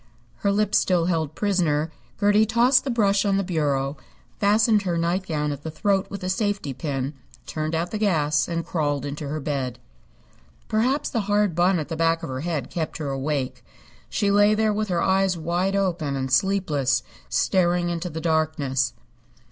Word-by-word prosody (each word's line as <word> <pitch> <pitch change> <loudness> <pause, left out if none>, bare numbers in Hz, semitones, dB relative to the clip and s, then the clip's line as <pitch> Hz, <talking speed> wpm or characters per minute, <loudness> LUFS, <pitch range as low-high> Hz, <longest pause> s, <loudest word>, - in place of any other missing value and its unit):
Her 200 - +1
lip 210 0 +1
still 175 -3 +3
held 160 -4 -1
prisoner, 165 -6 +1 0.3
Gertie 205 +1 +4
tossed 240 +4 +4
the - - -2
brush 205 -5 +2
on 200 -2 +2
the 195 - +1
bureau, 145 -5 -1 0.4
fastened 210 +1 +4
her 180 -3 -1
nightgown 165 -3 -1
at 140 -1 -6
the 160 - -5
throat 195 +5 0
with 200 -1 -7
a - - -2
safety 200 - -1
pin, 135 0 -3 0.3
turned 155 +1 -3
out 170 +2 -2
the 215 - -3
gas 155 -8 +2
and 170 -1 -3
crawled 145 -4 -1
into 145 +1 -4
bed. 135 -4 -3 0.9
Perhaps 250 +7 +1
the 235 - 0
hard 205 -3 +2
bun 175 +3 +3
at 155 - -3
the 165 - -3
back 165 +1 +1
of 165 - -4
her 130 0 -4
head 155 -5 -3
kept 160 -3 -3
her 150 -3 -4
awake. 135 -1 -2 0.5
She 200 -1 +1
lay 205 +1 +5
there 215 0 +2
with 215 +1 -1
her 175 -3 0
eyes 190 -1 +2
wide 175 +4 -1
open 175 -7 0
and 130 -1 -3
sleepless, 170 -5 +2 0.3
staring 175 -1 +2
into 170 +1 -3
the 160 0 -6
darkness. 150 -5 0
170 Hz, 175 wpm, -24 LUFS, 150-200 Hz, 0.9 s, lay